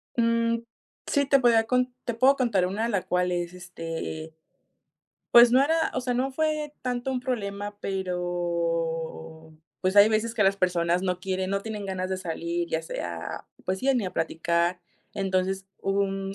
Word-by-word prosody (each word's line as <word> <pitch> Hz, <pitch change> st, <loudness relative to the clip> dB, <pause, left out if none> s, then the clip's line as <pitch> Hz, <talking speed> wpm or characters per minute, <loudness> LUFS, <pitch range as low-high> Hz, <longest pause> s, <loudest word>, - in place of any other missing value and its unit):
Mm, 230 Hz, 0 st, +2 dB, 0.5 s
sí, 285 Hz, -1 st, +2 dB
te 275 Hz, 0 st, +4 dB
podría 230 Hz, -3 st, +5 dB
cont 250 Hz, +1 st, +2 dB, 0.2 s
te 240 Hz, -, -1 dB
puedo 260 Hz, +4 st, +5 dB
contar 210 Hz, -9 st, +2 dB
una, 215 Hz, +5 st, -1 dB
la 200 Hz, -5 st, 0 dB
cual 180 Hz, 0 st, 0 dB
es, 175 Hz, 0 st, -2 dB
este, 165 Hz, -2 st, -6 dB, 1.0 s
pues, 240 Hz, 0 st, +9 dB
no 260 Hz, +2 st, +5 dB
era, 320 Hz, +2 st, +2 dB
o 255 Hz, -, 0 dB
sea, 250 Hz, 0 st, -1 dB
no 260 Hz, +2 st, 0 dB
fue 305 Hz, +1 st, -1 dB
tanto 250 Hz, +1 st, -2 dB
un 255 Hz, -1 st, -1 dB
problema, 205 Hz, -4 st, -3 dB
pero 170 Hz, -3 st, -2 dB, 0.3 s
pues, 190 Hz, +2 st, 0 dB
hay 205 Hz, +1 st, +9 dB
veces 225 Hz, +1 st, 0 dB
que 210 Hz, -4 st, +3 dB
las 195 Hz, +1 st, +3 dB
personas 180 Hz, -1 st, +1 dB
no 180 Hz, -1 st, -1 dB
quieren 190 Hz, 0 st, -2 dB
no 200 Hz, 0 st, 0 dB
tienen 210 Hz, -3 st, -5 dB
ganas 185 Hz, -1 st, -3 dB
de 190 Hz, -, 0 dB
salir, 170 Hz, -1 st, -3 dB
ya 160 Hz, 0 st, -1 dB
sea, 85 Hz, -, -5 dB, 0.2 s
pues 190 Hz, +1 st, -1 dB
sí, 270 Hz, +1 st, +3 dB
ni 235 Hz, -5 st, +1 dB
a 180 Hz, -, -4 dB
platicar. 170 Hz, +2 st, 0 dB, 0.3 s
Entonces, 190 Hz, 0 st, -1 dB
hubo 195 Hz, +1 st, 0 dB
un 195 Hz, 0 st, -3 dB
195 Hz, 175 wpm, -26 LUFS, 175-235 Hz, 1.0 s, pues